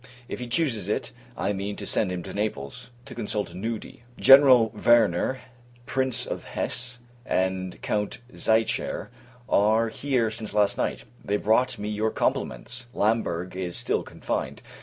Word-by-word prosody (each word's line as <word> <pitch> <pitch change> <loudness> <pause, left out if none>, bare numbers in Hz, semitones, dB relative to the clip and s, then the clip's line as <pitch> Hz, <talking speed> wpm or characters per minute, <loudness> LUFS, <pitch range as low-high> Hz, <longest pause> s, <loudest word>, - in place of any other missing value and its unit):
If - - -5
he 125 - -5
chooses 120 - 0
it, - - -1 0.3
I 100 - 0
mean 100 +1 -3
to - - -6
send 100 -4 +2
him 90 -1 -4
to - - -8
Naples, 100 - -4 0.2
to 140 - -9
consult 105 -5 -3
Noody 110 +5 -5
[Nudi.] - - -25
General 135 -4 +8
Werner, 115 +1 +3 0.4
Prince 130 -1 0
of - - -5
Hesse, 125 +1 -2 0.3
and 95 -4 -1
Count 105 -1 -1 0.2
Zichare, 110 -2 0 0.4
are 110 +3 +3
here 125 -3 0
since 110 -1 -6
last 105 -1 +3
night; - - -2 0.2
they 105 - 0
brought 120 +5 +2
me 105 - -5
your 105 +1 0
compliments. 120 - -2
Lamberg 95 -5 0
is 90 -2 -3
still - - +1
confined. - - -4
110 Hz, 150 wpm, -26 LUFS, 100-120 Hz, 0.4 s, General